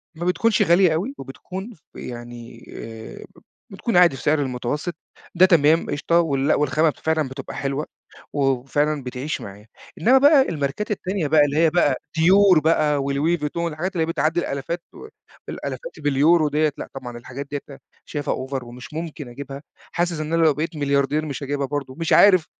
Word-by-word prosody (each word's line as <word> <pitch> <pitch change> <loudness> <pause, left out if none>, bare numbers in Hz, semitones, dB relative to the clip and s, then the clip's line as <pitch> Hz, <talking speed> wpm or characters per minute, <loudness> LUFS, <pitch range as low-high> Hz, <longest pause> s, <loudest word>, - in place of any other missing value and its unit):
ما 170 +2 -5
بتكونش 210 +5 +2
غالية 175 0 +4
أوي، 195 - -2
وبتكون 190 - -8
ف 155 - -24
يعني 120 -1 -9
آآ 110 -1 -9
بت - - -20 0.3
بتكون 195 +1 -1
عادي 175 -5 +6
في - - -9
سعر 150 +1 +2
المتوسط، 135 +6 -3 0.4
ده 180 +2 +7
تمام 165 -2 +3
قشطة 170 +4 +1
ولأ، 140 -2 +1
والخامة 150 +2 +2
فعلًا 160 -3 0
بتبقى 135 +1 -8
حلوة 140 +2 -2 0.5
و 145 - -3
وفعلًا 135 +2 0
بتعيش 125 +4 -4
معايا، 100 +2 -11 0.3
إنما 255 +4 +6
بقى 285 +1 +6
الماركات 150 +7 -3
التانية 190 -4 -2
بقى 150 +1 +5
اللي 145 +1 -2
هي 165 0 +5
بقى 155 -5 +2 0.2
Dior 185 +1 +6
بقى، 150 -2 +2
وLouis 145 +5 0
Vuitton، 150 +2 -4
الحاجات 175 +6 -4
اللي 165 - 0
هي - - +2
بتعدِّي 160 +2 0
الآلافات 170 +3 -4
و - - -11 0.4
الآلافات - - -6
باليورو 150 +3 +3
ديّة، 150 +1 +1
لأ، - - -6
طبعًا 125 -3 -7
الحاجات 130 +4 -8
ديّة 145 - -2 0.5
شايفها 145 -2 -3
Over 135 -2 -4
ومش 120 +3 -11
ممكن 160 -3 -6
أجيبها، 140 +2 -8 0.3
حاسس 175 -1 -1
إن 155 +1 -4
أنا 165 - +3
لو 155 -2 +5
بقيت 155 +4 -4
ملياردير 145 +1 0
مش 140 -2 -5
هاجيبها 140 0 -2
برضه، 135 -2 -4
مش 165 - 0
عارف 185 -5 +6
150 Hz, 180 wpm, -22 LUFS, 135-170 Hz, 0.5 s, ده